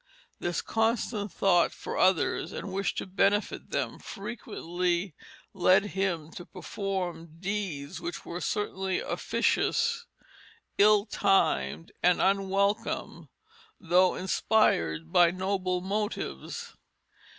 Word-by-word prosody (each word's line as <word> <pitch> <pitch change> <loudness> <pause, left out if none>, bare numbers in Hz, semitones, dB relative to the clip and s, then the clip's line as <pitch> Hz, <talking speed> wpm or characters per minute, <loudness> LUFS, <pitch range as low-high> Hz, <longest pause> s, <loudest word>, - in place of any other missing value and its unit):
This 175 0 -2
constant 225 -2 0
thought 175 -1 +3
for - - -6
others 185 -4 +2
and 195 - -5
wish 195 +1 -1
to - - -3
benefit 200 +2 0
them - - -2
frequently 180 -4 -3 0.4
led 190 +2 +4
him 175 -5 -1
to 175 - -8
perform 180 -5 -4
deeds 185 -7 -3
which 175 - -5
were 175 +1 -5
certainly 190 -3 -1
officious, 470 0 0 0.7
ill 210 0 +6
timed, 75 - +1
and 180 0 +4
unwelcome, 195 +1 0 0.5
though 180 +2 +3
inspired 80 - +1
by 175 -1 +7
noble 185 0 -1
motives. 215 - -4
190 Hz, 100 wpm, -29 LUFS, 175-205 Hz, 0.7 s, by